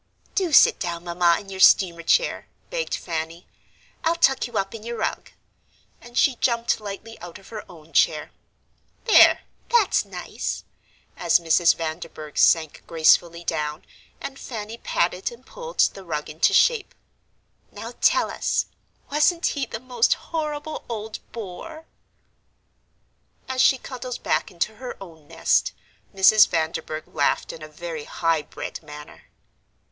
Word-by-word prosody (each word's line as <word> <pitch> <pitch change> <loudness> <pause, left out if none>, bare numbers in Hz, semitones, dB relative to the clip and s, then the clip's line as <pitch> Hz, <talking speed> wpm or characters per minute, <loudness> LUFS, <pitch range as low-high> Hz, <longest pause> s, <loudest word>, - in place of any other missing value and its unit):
"Do 370 -4 0
sit - - +6
down, 170 -1 -4
Mamma, 170 -1 +2
in 200 - -12
your 190 -1 -7
steamer 175 -3 +5
chair," - - +1 0.2
begged - - -2
Fanny; 165 0 -5 0.6
"I'll 330 +1 +2
tuck 270 -7 +3
you 235 -3 -5
up 195 0 -1
in 225 - -8
your 235 +1 -5
rug." - - -3 0.7
And 240 0 -11
she 260 -4 +3
jumped 235 -2 +1
lightly 210 +2 -8
out 175 -1 -9
of 195 - -17
her 215 -2 -7
own 165 -2 -16
chair. - - +2 0.7
"There, 450 - +7 0.3
that's 465 -5 +3
nice," - - -5 0.5
as - - +3
Mrs. 170 +1 +4
Vanderburgh 155 -2 -6
sank 160 -3 +3
gracefully 170 +1 +3
down, 150 -1 -3 0.3
and 275 0 -7
Fanny 225 -1 -7
patted 180 +4 -1
and 240 +2 -15
pulled - - -3
the 195 - +1
rug 155 -4 -4
into 155 - +2
shape. 470 -5 +3 0.8
"Now - - -8
tell - - +3
us, - - 0 0.5
wasn't 305 +4 +2
he 275 -3 -1
the 225 - -6
most 245 -1 +2
horrible 305 -1 -5
old 220 -1 -5
bore?" 235 - -8 1.6
As 260 -1 0
she 265 - +5
cuddled 255 -1 -7
back - - 0
into 190 +5 -3
her 255 +1 -7
own 160 -6 -13
nest, - - +1 0.4
Mrs. 200 +2 +6
Vanderburgh 160 -1 -3
laughed 145 -1 0
in 160 - -11
a 155 - -7
very 155 0 -7
high 165 -2 0
bred 150 - -8
manner. 150 -1 -12
195 Hz, 140 wpm, -24 LUFS, 165-255 Hz, 1.6 s, There